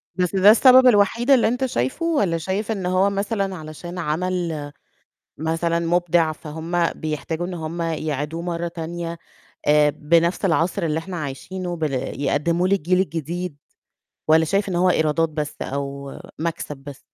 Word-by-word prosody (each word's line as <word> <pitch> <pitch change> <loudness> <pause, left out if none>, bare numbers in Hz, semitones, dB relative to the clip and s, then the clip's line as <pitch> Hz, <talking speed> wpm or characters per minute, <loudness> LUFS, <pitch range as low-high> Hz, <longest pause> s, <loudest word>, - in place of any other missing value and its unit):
بس 180 0 0
ده 195 +2 +7
السبب 255 +2 +7
الوحيد 230 +4 +3
اللي 255 -5 +6
أنت 250 +3 0
شايفه 130 - -2
والّا 205 - +1
شايف 195 +6 -2
إن 195 -4 -3
هو 185 +2 +3
مثلًا 200 -1 -2
علشان 160 +2 -8
عمل 165 -2 -2 0.7
مثلًا 165 +2 0
مبدع، 170 -1 +2
فهما 165 +2 -2
بيحتاجوا 155 +2 -4
إن 180 - -5
هم 165 +1 -4
يعيدوه 155 0 -3
مرّة 170 -1 -2
تانية 170 0 -5 0.5
آآ 150 0 +5
بنَفْس 170 +6 +1
العصر 175 +1 +1
اللي 160 -1 0
إحنا 180 +2 -6
عايشينه 175 +5 -5
بل 155 -3 -2 0.3
يقدّمه 170 +6 +1
للجيل 185 -1 +2
الجديد 170 -2 -3 0.7
والّا 160 +1 +5
شايف 200 +4 0
إن 180 - -2
هو 180 +1 +3
إيرادات 160 -1 +2
بس 150 -1 -5
أو 140 0 -4 0.3
مَكسب 160 -3 -3
بس؟ 135 0 -11
170 Hz, 145 wpm, -22 LUFS, 155-185 Hz, 0.7 s, ده